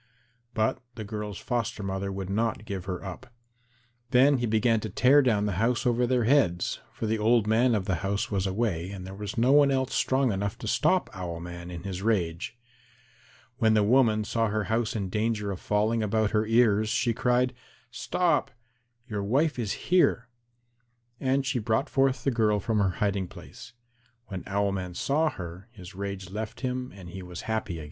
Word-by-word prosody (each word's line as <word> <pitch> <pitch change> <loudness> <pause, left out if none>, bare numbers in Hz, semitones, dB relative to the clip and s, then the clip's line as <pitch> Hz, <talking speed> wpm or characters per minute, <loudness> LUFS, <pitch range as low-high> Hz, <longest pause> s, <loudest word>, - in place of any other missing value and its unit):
But 110 0 +1 0.2
the 110 - -5
girl's 105 -2 -5
foster 115 -2 -2
mother 95 0 -3
would 95 -1 -4
not 110 +1 -1
give 100 -4 -5
her 95 0 -5
up. 95 +7 -8 0.8
Then 130 +2 +5
he 120 - 0
began 110 +1 +2
to 110 - -5
tear 130 +8 +5
down 110 -6 +2
the 105 - 0
house 120 +3 +1
over 120 0 +2
their 125 -1 +2
heads, 110 -9 +2
for - - -5
the 110 0 0
old 115 0 +3
man 115 +3 +3
of 100 -3 -1
the 95 -2 0
house 100 +5 -2
was 95 -1 0
away 95 -4 -1
and 95 -2 -7
there 95 - -8
was 100 +1 -6
no 120 +3 +4
one 145 0 +6
else 130 -1 0
strong 130 -2 +2
enough 100 0 -2
to - - -7
stop - - +2
Owl 85 -3 -5
man 85 0 -8
in 85 -1 -7
his 95 -2 -5
rage. 95 -1 -1 1.0
When 110 -3 +4
the 105 - +4
woman 110 -1 +4
saw 115 +1 0
her 105 0 -1
house 115 +1 -1
in 100 -3 -2
danger 105 0 -1
of 95 - -5
falling 110 +2 +1
about 110 0 +1
her 110 -1 +1
ears, 110 -2 +3
she 115 +1 +1
cried, 125 +2 +1 0.4
"Stop; 150 +4 0 0.6
your 105 -3 -3
wife 135 +8 +1
is 110 -4 -1 0.2
here." 125 -10 +3 0.9
And 135 +1 +1
she 130 -2 0
brought 110 +6 0
forth 135 -3 +2
the 135 - +2
girl 110 -3 +2
from 110 +2 0
her 100 -2 +3 0.2
hiding 100 -2 -1
place. 125 - -12 0.6
When 95 -3 -5
Owl 100 0 +1
man 90 -2 -4
saw 155 - +1
her, 90 - -8
his 95 -4 -11
rage 95 -1 -5
left 110 +3 -5
him 125 -1 -3
and 90 -3 -10
he 95 +2 -7
was 90 -1 -8
happy 110 -4 -2
again. 85 - -5
110 Hz, 190 wpm, -27 LUFS, 95-120 Hz, 1.0 s, one